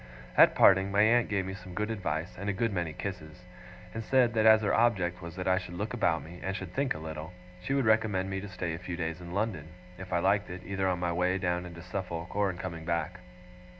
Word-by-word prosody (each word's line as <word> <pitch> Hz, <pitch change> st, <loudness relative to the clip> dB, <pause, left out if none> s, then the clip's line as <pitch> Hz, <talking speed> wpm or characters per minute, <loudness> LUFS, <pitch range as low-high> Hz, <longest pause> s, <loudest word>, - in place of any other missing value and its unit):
At -, -, +7 dB
parting, 95 Hz, 0 st, +6 dB
my 100 Hz, +1 st, +4 dB
aunt 120 Hz, +2 st, +4 dB
gave 100 Hz, -3 st, 0 dB
me 95 Hz, -, -4 dB
some 90 Hz, -2 st, -10 dB
good 105 Hz, +2 st, -1 dB
advice, 85 Hz, -4 st, -3 dB
and 100 Hz, +3 st, -4 dB
a -, -, +1 dB
good 115 Hz, +1 st, 0 dB
many 85 Hz, -3 st, -1 dB
kisses; 85 Hz, -2 st, -7 dB, 0.5 s
and 115 Hz, -, -4 dB
said 125 Hz, -1 st, +3 dB
that 110 Hz, -1 st, +3 dB
as 110 Hz, 0 st, +7 dB
her 100 Hz, -, +1 dB
object 95 Hz, -7 st, +2 dB
was 85 Hz, 0 st, -8 dB
that 90 Hz, 0 st, -4 dB
I 95 Hz, 0 st, +3 dB
should 90 Hz, -1 st, -8 dB
look 105 Hz, +6 st, -3 dB
about 85 Hz, -9 st, +1 dB
me, 85 Hz, +2 st, -11 dB
and 95 Hz, 0 st, -3 dB
should 95 Hz, -2 st, -6 dB
think 140 Hz, -1 st, 0 dB
a -, -, -5 dB
little, 80 Hz, +2 st, -7 dB, 0.3 s
she 135 Hz, -, -1 dB
would 135 Hz, -3 st, +1 dB
recommend 110 Hz, -4 st, +2 dB
me 95 Hz, 0 st, -3 dB
to 105 Hz, -, -7 dB
stay 90 Hz, -2 st, -3 dB
a 80 Hz, -, -5 dB
few 90 Hz, -1 st, -5 dB
days 80 Hz, 0 st, -3 dB
in 85 Hz, 0 st, -9 dB
London, 100 Hz, -8 st, -1 dB, 0.3 s
if 95 Hz, -1 st, -8 dB
I 85 Hz, -, +2 dB
liked 100 Hz, +3 st, +2 dB
it, 90 Hz, +1 st, -7 dB
either 95 Hz, -1 st, -1 dB
on 90 Hz, -1 st, +1 dB
my 85 Hz, -1 st, 0 dB
way 90 Hz, +2 st, +1 dB
down 90 Hz, -1 st, -1 dB
into 85 Hz, -1 st, -10 dB
Suffolk, 90 Hz, -2 st, -5 dB
or 100 Hz, -1 st, +2 dB
in 90 Hz, -, -5 dB
coming 85 Hz, -3 st, -6 dB
back. 85 Hz, +2 st, -2 dB
95 Hz, 250 wpm, -30 LUFS, 85-100 Hz, 0.5 s, At